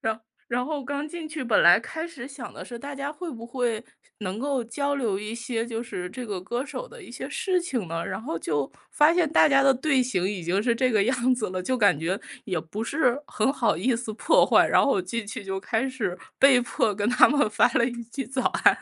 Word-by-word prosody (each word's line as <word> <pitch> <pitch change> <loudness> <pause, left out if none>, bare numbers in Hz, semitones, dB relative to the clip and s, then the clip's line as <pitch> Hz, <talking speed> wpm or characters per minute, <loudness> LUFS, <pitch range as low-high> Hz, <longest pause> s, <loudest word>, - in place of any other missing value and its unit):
然 220 0 -2 0.3
然 245 +1 0
后 295 0 -3
刚 285 +2 -3
进 320 0 -7
去， 310 -4 -5
本 230 -4 +3
来 175 +1 +8
开 320 +8 -6
始 265 -7 -9
想 275 -3 -8
的 - - -8
是 240 -1 -8
大 285 +3 -7
家 280 +2 -4
会 340 +1 -6
不 230 -3 -8
会， 235 -2 -2 0.4
能 195 0 -4
够 270 -1 -1
交 280 +5 -2
流 225 -8 -1
一 210 +2 -5
些， 230 0 -3
就 230 -1 -4
是 180 -7 -5
这 245 +6 -7
个 200 -5 -4
歌 240 +7 -3
手 - - -7
的 - - -13
一 - - -12
些 - - -6
事 370 -2 0
情 255 - -3
呢。 165 +1 -4
然 - - -4
后 165 - -3
就 145 -4 -2 0.2
发 300 +2 +5
现 340 -4 +2
大 - - +6
家 275 -2 +4
的 270 -1 +5
队 270 0 +2
形 240 -8 -1
已 190 -3 -3
经 185 +5 0
是 235 -1 +2
这 255 +1 +1
个 215 -3 +3
样 255 +1 +2
子 225 -6 -3
了， 185 0 -3
就 260 +6 0
感 200 -10 +4
觉 180 +5 -1 0.3
也 185 -4 -2
不 165 +7 -6
是 255 +1 +1
很 225 +5 0
好 245 -5 +1
意 240 +8 +1
思 230 -1 -4
破 - - +4
坏， - - +5
然 - - +4
后 280 - +2
我 190 - +1
进 215 +4 -4
去 200 0 -6
就 190 0 -3
开 225 +5 -1
始 235 -9 -3 0.2
被 270 -2 +7
迫 220 -3 0
跟 205 +1 -1
他 250 - +6
们 290 -6 +2
发 220 - +4
了 235 - +3
一 240 -1 -4
句 265 +3 -5
早 260 +2 -2 0.2
安。 - - +6
240 Hz, 270 characters per minute, -26 LUFS, 210-275 Hz, 0.4 s, 来